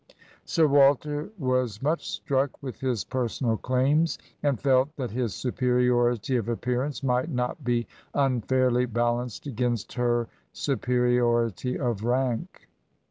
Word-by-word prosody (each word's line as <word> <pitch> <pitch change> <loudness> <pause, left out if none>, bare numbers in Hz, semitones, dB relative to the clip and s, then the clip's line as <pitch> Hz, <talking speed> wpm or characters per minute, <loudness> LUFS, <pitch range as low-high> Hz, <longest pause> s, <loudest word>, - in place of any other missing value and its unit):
Sir 165 -2 +3
Wal 140 -1 +6
ter 150 +4 -5
"was 130 - 0
much 155 +6 -1
struck 135 0 -1
with 130 -3 -6
his 125 -5 -1
personal 120 -2 -1
claims, 135 +8 +1 0.2
and 140 -6 +1
felt 130 0 +3
that 130 -6 -4
his 115 -4 -2
superiority 125 0 +1
of 115 -1 -2
appearance 125 +4 -2
might 125 +3 +1
not 125 +1 -2
be 120 -1 0 0.3
un 135 -4 +2
fairly 125 0 +2
balanced 120 +1 -1
against 120 -4 -2
her 120 -1 +1 0.3
superiority 125 -2 +1
of 120 -6 -2
rank. 125 -1 -1
125 Hz, 130 wpm, -26 LUFS, 120-135 Hz, 0.3 s, Wal